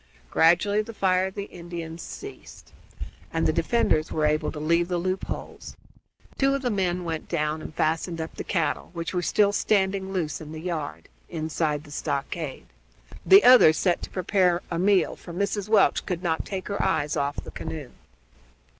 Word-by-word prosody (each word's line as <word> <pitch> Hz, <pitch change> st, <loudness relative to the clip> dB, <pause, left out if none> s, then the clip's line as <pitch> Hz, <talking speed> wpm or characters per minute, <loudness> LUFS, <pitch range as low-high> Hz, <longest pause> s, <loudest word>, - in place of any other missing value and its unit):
Gradually 190 Hz, +6 st, +4 dB
the 225 Hz, +1 st, -9 dB
fire 185 Hz, -1 st, +2 dB
of 190 Hz, -, -9 dB
the 200 Hz, -, -3 dB
Indians 170 Hz, -3 st, -8 dB
ceased, 405 Hz, 0 st, -10 dB, 0.6 s
and -, -, 0 dB
the -, -, +2 dB
defenders 195 Hz, -9 st, +1 dB
were 155 Hz, -1 st, +1 dB
able 150 Hz, 0 st, +1 dB
to 150 Hz, -, -7 dB
leave 170 Hz, +3 st, +2 dB
the 175 Hz, -1 st, -1 dB
loop 185 Hz, +2 st, -2 dB
holes. -, -, -7 dB, 0.6 s
Two 275 Hz, 0 st, +3 dB
of 275 Hz, -, -4 dB
the 245 Hz, -, 0 dB
men 180 Hz, -3 st, 0 dB
went 165 Hz, -2 st, -4 dB
down 155 Hz, -1 st, -1 dB
and -, -, -7 dB
fastened 165 Hz, +2 st, 0 dB
up 160 Hz, 0 st, -5 dB
the -, -, -6 dB
cattle, 170 Hz, -5 st, -1 dB
which 170 Hz, 0 st, -4 dB
were 180 Hz, -, 0 dB
still 200 Hz, +3 st, +3 dB
standing 195 Hz, -2 st, +1 dB
loose 165 Hz, -6 st, -2 dB
in 155 Hz, 0 st, -8 dB
the 160 Hz, -, -6 dB
yard 160 Hz, -4 st, -4 dB, 0.2 s
inside 155 Hz, -2 st, -2 dB
the 150 Hz, -, -14 dB
stockade; 145 Hz, 0 st, -4 dB, 0.6 s
the 195 Hz, +2 st, +8 dB
other 250 Hz, -10 st, +8 dB
set 175 Hz, +3 st, +1 dB
to -, -, -4 dB
to -, -, -24 dB
prepare 185 Hz, -2 st, +2 dB
a 170 Hz, -, -1 dB
meal, 195 Hz, +1 st, +3 dB
for 170 Hz, -, -11 dB
Mrs. 200 Hz, +2 st, -2 dB
Welch 215 Hz, -3 st, +4 dB
could 180 Hz, 0 st, -3 dB
not 160 Hz, -2 st, -1 dB
take 190 Hz, -2 st, -4 dB
her 200 Hz, -, -2 dB
eyes 150 Hz, -6 st, 0 dB
off 140 Hz, +1 st, -1 dB
the -, -, -7 dB
canoe. 150 Hz, -6 st, -6 dB
175 Hz, 185 wpm, -25 LUFS, 160-195 Hz, 0.6 s, the